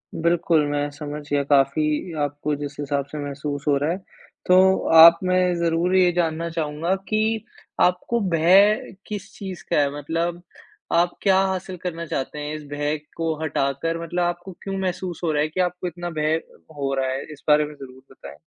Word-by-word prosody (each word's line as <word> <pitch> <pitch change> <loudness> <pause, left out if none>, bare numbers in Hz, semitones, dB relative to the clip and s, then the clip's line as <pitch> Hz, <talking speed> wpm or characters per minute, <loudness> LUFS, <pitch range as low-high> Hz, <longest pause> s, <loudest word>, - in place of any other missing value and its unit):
बिल्कुल 165 -2 +2
मैं 145 0 -1
समझ 145 0 -6
गया, 145 -1 +1
काफ़ी 150 +4 +1
आपको 145 +1 -2
जिस 145 0 -6
हिसाब 140 -1 -1
से 155 - -6
महसूस 145 0 -5
हो 145 - +4
रहा 145 +3 0
है। 175 - -2 0.5
तो 190 +1 +5 0.2
आप 165 +1 +10
मैं 185 0 +2
ज़रूर 170 +2 +1
ये 180 -1 +5
जानना 170 -1 -1
चाहूँगा 160 +2 -2 0.2
कि 220 0 +1 0.4
आपको 180 +6 +2
भय 195 +8 +4
किस 210 -2 -6
चीज़ 190 -4 -8
का - - +2
है? 145 -1 +3
मतलब 165 +4 -2 0.5
आप 175 +1 +2
क्या 190 -2 +4
हासिल 190 -1 -2
करना 170 -2 -4
चाहते 150 0 -4
हैं 150 +1 -4
इस 155 - -8
भय 145 +1 -1 0.2
को 165 -1 0
हटाकर 150 +3 -1
मतलब 175 +2 -2
आपको 175 +2 -3
क्यों 195 -1 -4
महसूस 185 -2 -3
हो 165 - +1
रहा 150 - +1
है 150 - +1
कि 175 - -6
आपको 180 0 -2
इतना 175 +1 -5
भय 155 0 0 0.4
हो 135 -1 -1
रहा 135 -1 0
है? 135 +1 -3
इस 145 - -16
बारे 150 0 +5
में 150 0 -10
ज़रूर 130 -2 -12
बताएँ। - - -12
165 Hz, 185 wpm, -23 LUFS, 145-180 Hz, 0.5 s, आप